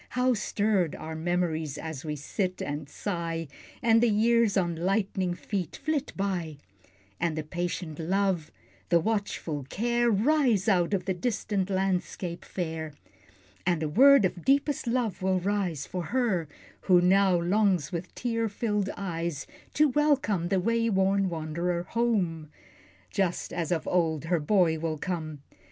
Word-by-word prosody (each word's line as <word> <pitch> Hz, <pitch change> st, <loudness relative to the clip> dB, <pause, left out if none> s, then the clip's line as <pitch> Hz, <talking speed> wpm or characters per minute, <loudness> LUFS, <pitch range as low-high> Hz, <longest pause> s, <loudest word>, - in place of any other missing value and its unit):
How 250 Hz, 0 st, +3 dB
stirred 205 Hz, -6 st, 0 dB
Are 160 Hz, +1 st, -7 dB
memories 160 Hz, -3 st, -1 dB
as 160 Hz, -4 st, -6 dB
we 150 Hz, -2 st, -3 dB
sit 185 Hz, +6 st, -3 dB
and 145 Hz, 0 st, -4 dB
sigh, 165 Hz, -3 st, -3 dB, 0.4 s
And 225 Hz, -1 st, +5 dB
the 240 Hz, -, +4 dB
years 225 Hz, 0 st, +3 dB
on 175 Hz, -3 st, +1 dB
lightning 190 Hz, 0 st, 0 dB
feet 180 Hz, -3 st, -4 dB
flit 300 Hz, -2 st, -2 dB
by, 180 Hz, -6 st, -2 dB, 0.6 s
And 165 Hz, -2 st, 0 dB
the 155 Hz, -, -2 dB
patient 175 Hz, 0 st, -4 dB
Love, 185 Hz, -1 st, 0 dB, 0.4 s
the 170 Hz, -, +5 dB
watchful 200 Hz, -7 st, -2 dB
care, 240 Hz, +2 st, +1 dB
Rise 230 Hz, -2 st, +2 dB
out 185 Hz, -2 st, +3 dB
of 185 Hz, -, -3 dB
the 190 Hz, -, 0 dB
distant 200 Hz, -1 st, -1 dB
landscape 185 Hz, -2 st, -2 dB
fair, 160 Hz, -4 st, -4 dB, 0.7 s
And 175 Hz, -3 st, +1 dB
a -, -, 0 dB
word 270 Hz, -, +6 dB
of 175 Hz, -2 st, -3 dB
deepest 280 Hz, -1 st, +1 dB
love 235 Hz, -5 st, -1 dB
will 185 Hz, 0 st, +2 dB
rise 185 Hz, -6 st, -1 dB
For 180 Hz, -2 st, -4 dB
her, 225 Hz, -10 st, 0 dB, 0.4 s
who 180 Hz, -2 st, +7 dB
now 185 Hz, 0 st, +4 dB
longs 185 Hz, -2 st, +2 dB
with 170 Hz, 0 st, -5 dB
tear 230 Hz, -2 st, -1 dB
filled 205 Hz, -2 st, -1 dB
eyes 170 Hz, -5 st, -3 dB, 0.3 s
To 305 Hz, +1 st, +5 dB
welcome 270 Hz, -, +1 dB
the 190 Hz, +1 st, +1 dB
way 230 Hz, +4 st, +1 dB
worn 195 Hz, -1 st, +2 dB
wand'rer 170 Hz, +2 st, -2 dB
home, 185 Hz, -9 st, -1 dB, 0.6 s
Just 190 Hz, -4 st, -1 dB
as 170 Hz, -2 st, -2 dB
of 165 Hz, -3 st, -1 dB
old 160 Hz, -4 st, +1 dB
her 170 Hz, 0 st, +1 dB
boy 160 Hz, 0 st, +2 dB
will 160 Hz, -1 st, -2 dB
come! 155 Hz, -4 st, -4 dB
185 Hz, 145 wpm, -28 LUFS, 165-210 Hz, 0.7 s, who